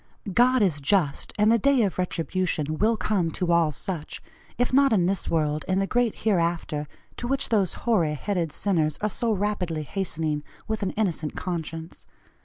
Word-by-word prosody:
"'God 250 Hz, +1 st, +4 dB
is 160 Hz, -7 st, +1 dB
just,' 150 Hz, -1 st, +1 dB
and 210 Hz, +1 st, +4 dB
the 230 Hz, -, +4 dB
day 270 Hz, +1 st, +4 dB
of 190 Hz, -3 st, -1 dB
retribution 165 Hz, -3 st, -1 dB
will 220 Hz, +2 st, +3 dB
come 195 Hz, -6 st, 0 dB
to 175 Hz, +1 st, -1 dB
all 170 Hz, -2 st, +4 dB
such, 155 Hz, +1 st, -5 dB, 0.4 s
if 245 Hz, +1 st, 0 dB
not 275 Hz, 0 st, +5 dB
in 190 Hz, -6 st, +3 dB
this 190 Hz, +1 st, -1 dB
world, 155 Hz, -2 st, 0 dB
in 185 Hz, -, +1 dB
the 195 Hz, -, +2 dB
great 245 Hz, +1 st, +1 dB
hereafter, 170 Hz, -6 st, 0 dB, 0.3 s
to 240 Hz, -, -4 dB
which 275 Hz, +2 st, 0 dB
those 200 Hz, -5 st, +2 dB
hoary 175 Hz, -10 st, +2 dB
headed 175 Hz, 0 st, -2 dB
sinners 160 Hz, -6 st, 0 dB
are 210 Hz, -, +1 dB
so 230 Hz, +3 st, 0 dB
rapidly 190 Hz, -6 st, -1 dB
hastening, 160 Hz, -4 st, -2 dB, 0.3 s
with 220 Hz, 0 st, -2 dB
an 195 Hz, -, 0 dB
innocent 170 Hz, -8 st, -1 dB
conscience. 165 Hz, -2 st, -5 dB
185 Hz, 175 wpm, -25 LUFS, 160-215 Hz, 0.4 s, not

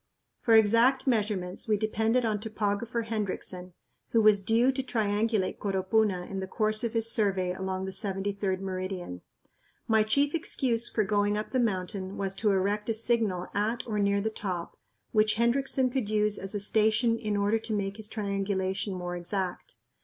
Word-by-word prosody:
For 230 Hz, -, +4 dB
exact 230 Hz, +5 st, +5 dB
measurements 210 Hz, -7 st, -1 dB
we 215 Hz, -1 st, +3 dB
depended 220 Hz, +3 st, +1 dB
on 215 Hz, -2 st, 0 dB
Topographer 220 Hz, +2 st, -2 dB
Hendriksen, 190 Hz, -4 st, -4 dB, 0.4 s
who 230 Hz, -, +5 dB
was 210 Hz, -2 st, +5 dB
due 230 Hz, +6 st, +3 dB
to 265 Hz, 0 st, -2 dB
triangulate 215 Hz, -4 st, 0 dB
Coropuna 195 Hz, -1 st, +1 dB
in 195 Hz, -, -4 dB
the 190 Hz, -, -4 dB
course 215 Hz, +2 st, 0 dB
of 235 Hz, -1 st, -1 dB
his 230 Hz, 0 st, 0 dB
survey 190 Hz, -4 st, +1 dB
along 190 Hz, 0 st, -3 dB
the 190 Hz, -, -4 dB
73d 195 Hz, -1 st, -2 dB
meridian. 185 Hz, -, -4 dB, 0.7 s
My 220 Hz, -1 st, +4 dB
chief 280 Hz, +7 st, +2 dB
excuse 250 Hz, -8 st, 0 dB
for 215 Hz, -, +1 dB
going 205 Hz, +1 st, +1 dB
up 210 Hz, -, -4 dB
the 255 Hz, -, +1 dB
mountain 190 Hz, -3 st, -2 dB
was 195 Hz, -1 st, -2 dB
to 215 Hz, -, +1 dB
erect 205 Hz, +2 st, 0 dB
a 225 Hz, -, +2 dB
signal 220 Hz, -5 st, +1 dB
at 220 Hz, +4 st, -1 dB
or 215 Hz, -3 st, -2 dB
near 200 Hz, 0 st, +2 dB
the 220 Hz, +2 st, -1 dB
top 185 Hz, -5 st, -4 dB, 0.4 s
which 215 Hz, 0 st, +3 dB
Hendriksen 255 Hz, +2 st, +1 dB
could 250 Hz, -5 st, -1 dB
use 210 Hz, -1 st, +1 dB
as 195 Hz, +2 st, -5 dB
a -, -, 0 dB
station 220 Hz, +3 st, +2 dB
in 210 Hz, -2 st, -1 dB
order 205 Hz, +2 st, +2 dB
to 220 Hz, 0 st, -3 dB
make 200 Hz, 0 st, -2 dB
his 220 Hz, -1 st, -7 dB
triangulation 195 Hz, -2 st, -2 dB
more 175 Hz, -1 st, -4 dB
exact. 180 Hz, -4 st, -4 dB
210 Hz, 170 wpm, -28 LUFS, 195-225 Hz, 0.7 s, exact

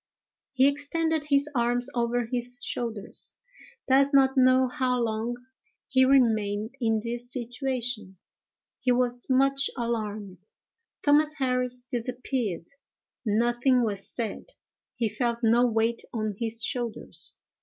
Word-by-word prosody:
He 265 Hz, +1 st, +5 dB
extended 300 Hz, +2 st, 0 dB
his 285 Hz, -1 st, +2 dB
arms 245 Hz, 0 st, +1 dB
over 240 Hz, 0 st, 0 dB
his 245 Hz, +1 st, -4 dB
shoulders. 230 Hz, -6 st, -4 dB, 0.5 s
Does 275 Hz, +2 st, +4 dB
not 265 Hz, 0 st, +5 dB
know 255 Hz, 0 st, +5 dB
how 250 Hz, 0 st, 0 dB
long 230 Hz, +1 st, -1 dB, 0.5 s
he 260 Hz, 0 st, +5 dB
remained 220 Hz, -4 st, +2 dB
in 225 Hz, -2 st, +2 dB
this 240 Hz, +1 st, -5 dB
situation. 245 Hz, -5 st, -3 dB, 0.6 s
He 255 Hz, -1 st, +1 dB
was 245 Hz, 0 st, 0 dB
much 275 Hz, +1 st, +3 dB
alarmed. 215 Hz, -5 st, -4 dB, 0.6 s
Thomas 300 Hz, +1 st, +4 dB
Harris 250 Hz, -3 st, -1 dB
disappeared. 245 Hz, -6 st, -3 dB, 0.6 s
Nothing 240 Hz, +4 st, +3 dB
was 200 Hz, -3 st, -1 dB
said. 235 Hz, -, -5 dB, 0.4 s
He 230 Hz, -, 0 dB
felt 235 Hz, +2 st, -2 dB
no 235 Hz, +2 st, +5 dB
weight 225 Hz, 0 st, +1 dB
on 215 Hz, -2 st, -2 dB
his 230 Hz, +1 st, -3 dB
shoulders. 240 Hz, -3 st, -5 dB
245 Hz, 115 wpm, -27 LUFS, 230-260 Hz, 0.6 s, He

